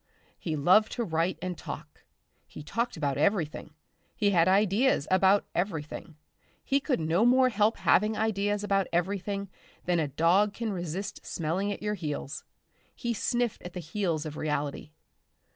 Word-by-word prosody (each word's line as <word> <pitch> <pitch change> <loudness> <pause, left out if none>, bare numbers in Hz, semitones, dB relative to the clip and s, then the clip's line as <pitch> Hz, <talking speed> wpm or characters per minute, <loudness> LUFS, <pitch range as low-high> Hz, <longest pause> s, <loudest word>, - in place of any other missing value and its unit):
He 160 -3 -3
loved 185 +9 +4
to 240 - -1
write 165 -1 0
and 180 -1 -3
talk. - - -8 0.5
He - - -10
talked 230 +8 -2
about 145 -3 -1
everything, 155 -3 0 0.4
he 205 -2 +2
had 170 -2 +4
ideas 200 - +3
about 190 +2 +4
everything; 165 -3 -3 0.5
he 275 - +2
could 275 -2 -1
no 165 +6 +2
more 255 +1 +5
help 220 -1 +2
having 210 +2 +3
ideas 205 -1 0
about 195 -2 +1
everything 195 +3 -1 0.4
than 175 -1 +2
a 155 - +1
dog 180 +8 +2
can 225 -3 -2
resist 185 +2 -5
smelling 180 +5 -2
at 205 - -6
your 210 0 0
heels. 150 -6 -4 0.5
He 240 -2 -2
sniffed 240 +2 -1
at 180 - -9
the 180 - -5
heels 165 -2 -2
of 155 -1 -6
reality. 150 -1 -2
190 Hz, 155 wpm, -28 LUFS, 160-210 Hz, 0.5 s, more